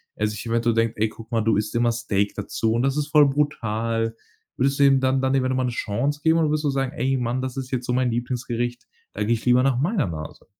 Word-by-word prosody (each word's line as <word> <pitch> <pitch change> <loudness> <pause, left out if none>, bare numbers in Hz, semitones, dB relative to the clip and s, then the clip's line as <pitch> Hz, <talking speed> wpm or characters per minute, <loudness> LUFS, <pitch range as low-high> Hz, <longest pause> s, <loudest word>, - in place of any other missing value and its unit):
er 105 - 0
sich 105 +2 -6
eventuell 115 0 +1
denkt: 115 0 +1
„Ey, 110 - +3
guck 115 +1 -13
mal, 115 - +1
du 110 0 +2
isst 105 0 -2
immer 120 0 +3
Steak 105 -4 -1
dazu 110 +2 -1
und 120 +2 +1
das 135 +1 0
ist 150 -1 -1
voll 150 -2 +6
brutal.“ 115 -5 -1 0.4
Würdest 135 +2 +1
du - - +5
ihm 135 -1 +5
dann 130 0 +1
dann 130 0 +1
lieber 130 -1 +2
nochmal 130 0 0
'ne - - -2
Chance 120 +6 -2
geben 160 0 +4
oder 160 -2 +2
würdest 150 0 -1
du - - +2
sagen: 135 -1 -1
„Ey 135 +2 0
Mann, 125 +1 -1
das 130 0 -4
ist 130 -1 -5
jetzt 125 -1 -2
so 125 - -1
mein 125 -1 +1
Lieblingsgericht, 120 0 -3 0.3
da 105 - -2
gehe 110 +3 +2
ich 110 - -8
lieber 125 0 +4
nach 130 -2 +2
meiner 170 - +1
Nase.“ 75 -2 -7
125 Hz, 260 wpm, -23 LUFS, 115-135 Hz, 0.4 s, voll